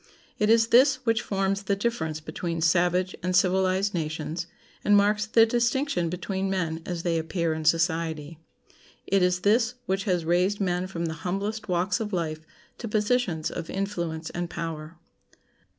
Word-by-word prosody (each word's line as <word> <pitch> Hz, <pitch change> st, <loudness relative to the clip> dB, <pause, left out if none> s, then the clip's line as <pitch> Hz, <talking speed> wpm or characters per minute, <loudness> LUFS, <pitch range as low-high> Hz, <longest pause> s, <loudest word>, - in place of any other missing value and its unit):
It 210 Hz, -, +2 dB
is 225 Hz, 0 st, +4 dB
this 260 Hz, +3 st, +6 dB
which 230 Hz, -1 st, +2 dB
forms 195 Hz, 0 st, -1 dB
the 200 Hz, 0 st, 0 dB
difference 180 Hz, -8 st, -2 dB
between 165 Hz, +2 st, -4 dB
savage 180 Hz, +2 st, +2 dB
and 180 Hz, +1 st, -1 dB
civilized 190 Hz, +2 st, +2 dB
nations, 160 Hz, 0 st, -3 dB, 0.4 s
and 205 Hz, 0 st, +5 dB
marks 210 Hz, +1 st, +2 dB
the 225 Hz, +1 st, +6 dB
distinction 235 Hz, -, 0 dB
between 190 Hz, +2 st, -3 dB
men 165 Hz, -4 st, -2 dB
as 175 Hz, -2 st, -3 dB
they 170 Hz, -2 st, +1 dB
appear 165 Hz, 0 st, -1 dB
in 155 Hz, 0 st, -5 dB
society. 160 Hz, -1 st, 0 dB, 0.7 s
It 195 Hz, -1 st, +2 dB
is 180 Hz, 0 st, +2 dB
this 225 Hz, +3 st, +2 dB
which 190 Hz, +1 st, -1 dB
has 180 Hz, -5 st, 0 dB
raised 180 Hz, +4 st, +2 dB
men 180 Hz, -2 st, 0 dB
from 170 Hz, -3 st, -4 dB
the 160 Hz, -, -2 dB
humblest 200 Hz, +4 st, -3 dB
walks 180 Hz, +2 st, +1 dB
of 210 Hz, -2 st, -4 dB
life 160 Hz, -3 st, -2 dB, 0.4 s
to 235 Hz, -, -5 dB
positions 210 Hz, -6 st, 0 dB
of 165 Hz, -2 st, -6 dB
influence 170 Hz, -5 st, -3 dB
and 175 Hz, 0 st, -4 dB
power. 165 Hz, -1 st, -6 dB
180 Hz, 160 wpm, -26 LUFS, 165-205 Hz, 0.7 s, this